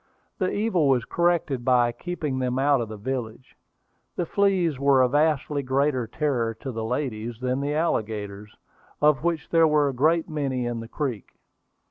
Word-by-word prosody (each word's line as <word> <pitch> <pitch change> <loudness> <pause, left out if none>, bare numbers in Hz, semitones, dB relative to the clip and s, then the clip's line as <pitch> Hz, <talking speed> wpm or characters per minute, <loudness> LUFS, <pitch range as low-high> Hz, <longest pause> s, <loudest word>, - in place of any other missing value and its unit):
The 185 -2 +1
evil 200 -8 +1
was 125 -3 +2
corrected 170 -7 0
by 120 -1 +3
keeping 150 0 -4
them 125 0 -1
out 140 -1 +3
of 115 - -4
the 110 - -7
village. 125 +1 -5 0.6
The 175 - -1
fleas 180 -6 +1
were 140 -2 +4
a - - +4
vastly 150 +1 +1
greater 130 -2 0
terror 120 -4 -1
to 130 +4 -6
the 115 -2 -4
ladies 115 -2 -3
than 130 +1 -1
the 145 +1 -1
alligators, 105 -9 -2 0.4
of 150 -1 +3
which 170 -2 -1
there 165 -1 +5
were 150 -2 +3
a - - -4
great 160 +6 +2
many 140 -6 -2
in 120 -1 -3
the 115 - -7
creek. 125 -5 -4
135 Hz, 170 wpm, -25 LUFS, 120-155 Hz, 0.6 s, there